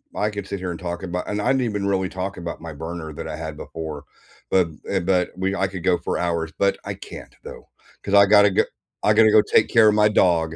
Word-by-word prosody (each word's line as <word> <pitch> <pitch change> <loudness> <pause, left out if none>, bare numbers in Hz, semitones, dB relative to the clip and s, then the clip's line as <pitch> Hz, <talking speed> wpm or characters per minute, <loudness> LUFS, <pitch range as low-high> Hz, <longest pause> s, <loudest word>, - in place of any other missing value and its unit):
I 105 - 0
could 100 -2 -6
sit 100 -1 -4
here 90 - -4
and 85 - -7
talk 85 0 -5
about 90 0 -4
and 105 0 -2
I - - -2
didn't 130 -1 +2
even 105 -4 -2
really 95 -2 0
talk 95 +1 -5
about 85 -2 -6
my 80 -1 -7
burner 80 +1 -6
that 80 - -7
I 75 - -5
had 80 -1 -7
before, 80 -3 -7 0.5
but 90 -3 +3 0.2
eh 95 - +1
but 90 0 0
we 95 +1 -1
I 95 - 0
could 95 -3 -8
go 90 -1 +3
for - - -3
hours, 85 -2 -1
but 100 0 +2
I - - -3
can't, - - -11
though, - - -11 0.3
'cause 100 - -4
I 100 0 +8
gotta 100 -1 +6
g - - +3 0.4
I 105 - +4
gotta 110 -1 +6
go 110 0 +7
take 110 - +2
care 110 -2 +5
of 105 - +2
my 105 0 +4
dog 85 -5 +2
95 Hz, 255 wpm, -22 LUFS, 85-100 Hz, 0.5 s, I